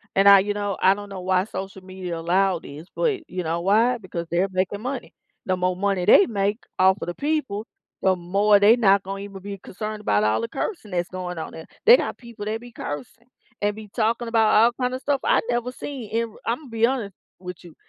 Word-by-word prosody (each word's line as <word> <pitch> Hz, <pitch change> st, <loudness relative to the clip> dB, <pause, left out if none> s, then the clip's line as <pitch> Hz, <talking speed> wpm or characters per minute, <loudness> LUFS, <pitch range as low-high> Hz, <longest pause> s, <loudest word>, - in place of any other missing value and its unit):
And 195 Hz, +1 st, +5 dB
I 200 Hz, -1 st, +10 dB
you 205 Hz, +2 st, -1 dB
know, 205 Hz, -2 st, -2 dB
I 190 Hz, -, +6 dB
don't 205 Hz, 0 st, -8 dB
know 195 Hz, -2 st, -7 dB
why 185 Hz, 0 st, +2 dB
social 190 Hz, -2 st, -7 dB
media 185 Hz, -2 st, -6 dB
allowed 180 Hz, +1 st, +1 dB
this, 150 Hz, +4 st, -10 dB
but, 400 Hz, -9 st, -1 dB
you 180 Hz, 0 st, -3 dB
know, 165 Hz, +1 st, -2 dB
why? 225 Hz, +7 st, +3 dB
Because 180 Hz, -5 st, -6 dB
they're 175 Hz, +3 st, +2 dB
making 190 Hz, +2 st, -1 dB
money. 255 Hz, +1 st, -5 dB, 0.3 s
The 185 Hz, -1 st, 0 dB
more 180 Hz, 0 st, 0 dB
money 195 Hz, -1 st, 0 dB
they 200 Hz, -, +7 dB
make 205 Hz, 0 st, -1 dB, 0.2 s
off 190 Hz, +1 st, +5 dB
of -, -, -4 dB
the 175 Hz, -, -4 dB
people, 285 Hz, -9 st, -2 dB, 0.4 s
the 190 Hz, -1 st, +3 dB
more 200 Hz, +4 st, +3 dB
they 210 Hz, +3 st, +7 dB
not 200 Hz, -4 st, +4 dB
gonna 195 Hz, +1 st, -5 dB
even 200 Hz, -1 st, -9 dB
be 200 Hz, +1 st, -6 dB
concerned 215 Hz, +3 st, -6 dB
about 105 Hz, -, +2 dB
all 105 Hz, +1 st, +2 dB
the 230 Hz, -, -2 dB
cursing 275 Hz, -, -4 dB
that's 175 Hz, 0 st, -1 dB
going 180 Hz, -1 st, -5 dB
on 160 Hz, -, -5 dB
there, 160 Hz, -, -9 dB, 0.2 s
they 475 Hz, +2 st, +9 dB
got -, -, -3 dB
people 235 Hz, -4 st, -9 dB
that 220 Hz, +2 st, -3 dB
be 245 Hz, -, -12 dB
cursing, 145 Hz, -, -7 dB, 0.3 s
and 205 Hz, 0 st, 0 dB
be 215 Hz, -1 st, -10 dB
talking 230 Hz, +1 st, 0 dB
about 225 Hz, -2 st, +3 dB
all 225 Hz, +3 st, +6 dB
kind 250 Hz, 0 st, 0 dB
of 260 Hz, -, -4 dB
stuff 285 Hz, -2 st, 0 dB
I've -, -, +3 dB
never 240 Hz, +1 st, -1 dB
seen, 255 Hz, -3 st, -7 dB
and, 230 Hz, -1 st, -1 dB
Imma 255 Hz, +6 st, -2 dB
be 225 Hz, 0 st, +2 dB
honest 235 Hz, -7 st, -2 dB, 0.2 s
with 180 Hz, -1 st, -8 dB
you, 170 Hz, -3 st, -14 dB
200 Hz, 230 wpm, -24 LUFS, 185-230 Hz, 0.4 s, I